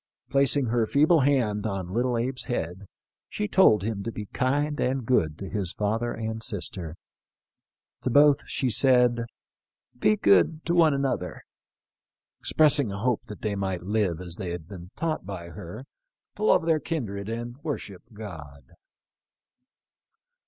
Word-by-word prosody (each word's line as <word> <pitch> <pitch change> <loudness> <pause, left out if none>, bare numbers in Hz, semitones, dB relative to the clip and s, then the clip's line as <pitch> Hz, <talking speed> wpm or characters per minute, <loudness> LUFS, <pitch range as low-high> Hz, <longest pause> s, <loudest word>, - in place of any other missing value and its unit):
Placing 140 0 +3
her 115 -1 +1
'feeble 155 +6 +4
hand 120 -7 +1
on 95 -3 -4
little 125 +2 +1
Abe's 125 +2 -2
head 95 -3 -4 0.4
she 210 - -3
told 110 - +5
him 105 -1 -3
to 115 - -4
be 105 -2 -6
kind 145 +6 -1
and 130 -1 0
good 80 -11 +1
to 95 - -7
his 95 -4 -2
father 110 +3 -1
and 110 0 -4
sister; 90 -8 -4 1.1
to 130 - -1
both 145 +2 +5
she 130 - -1
said, 125 -1 +4 0.4
' - - -37
Be 110 0 +4
good 100 - +3
to 170 - +1
one 165 -4 +5
another,' 135 -1 -2 1.0
expressing 145 -7 +3
a 100 - -5
hope 120 +2 -1
that 105 - -10
they 105 -1 -1
might 95 -3 -3
live, 100 -4 0
as 90 -1 -6
they 95 -4 -4
had 85 -2 -6
been 90 -2 -10
taught 160 -1 -2
by 90 -3 -7
her, 85 +9 -9 0.5
to - - -5
love 160 - +4
their 160 -2 +3
kindred 110 - -4
and 120 +2 -5
worship 140 - -5
God." 75 - -10
110 Hz, 150 wpm, -26 LUFS, 100-135 Hz, 1.1 s, told